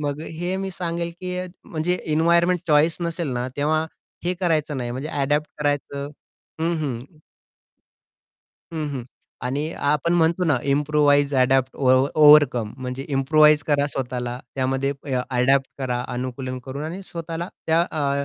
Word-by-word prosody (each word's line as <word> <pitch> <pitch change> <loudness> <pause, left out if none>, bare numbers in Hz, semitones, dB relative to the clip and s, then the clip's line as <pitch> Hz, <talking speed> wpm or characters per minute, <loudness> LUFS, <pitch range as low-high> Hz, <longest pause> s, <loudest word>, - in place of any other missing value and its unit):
मग 145 0 -2
हे 175 +4 -4
मी 195 0 -3
सांगेल 170 -1 -3
की 180 0 -4 0.3
म्हणजे 165 +2 -1 0.2
एन्व्हायर्नमेंट 170 +2 +3
चॉईस 155 +1 +4
नसेल 170 -2 -2
ना 125 0 -2
तेव्हा 155 +2 +1 0.4
हे 180 +1 0
करायचं 155 -5 +1
नाही 120 -2 -3
म्हणजे 130 +5 -4
अडॅप्ट 150 +1 0
करायचं 145 -1 -2 0.5
हं 165 +1 +1
हं. 125 -5 -3 1.7
हं, 155 -2 -2
हं. 130 - -4 0.4
आणि 145 +6 -2 0.2
आपण 160 +3 +1
म्हणतो 170 +1 +2
ना 150 -6 +3 0.2
इम्प्रोव्हाईज, 145 -1 +3
अडॅप्ट, 130 0 +2
ओव 130 0 +4
ओव्हरकम 145 -7 +6
म्हणजे 130 +1 -5
इम्प्रोव्हाईज 150 +2 +4
करा 145 -1 +2
स्वतःला 125 -1 -3 0.2
त्यामध्ये 135 +1 0 0.4
अडॅप्ट 135 +2 +3
करा, 125 -2 -1
अनुकूलन 130 +1 -4
करून 140 +3 -5
आणि 175 +5 -5
स्वतःला 170 -1 -5 0.2
त्या 160 +1 +4
अ, 140 -2 0
145 Hz, 140 wpm, -23 LUFS, 135-165 Hz, 1.7 s, ओव्हरकम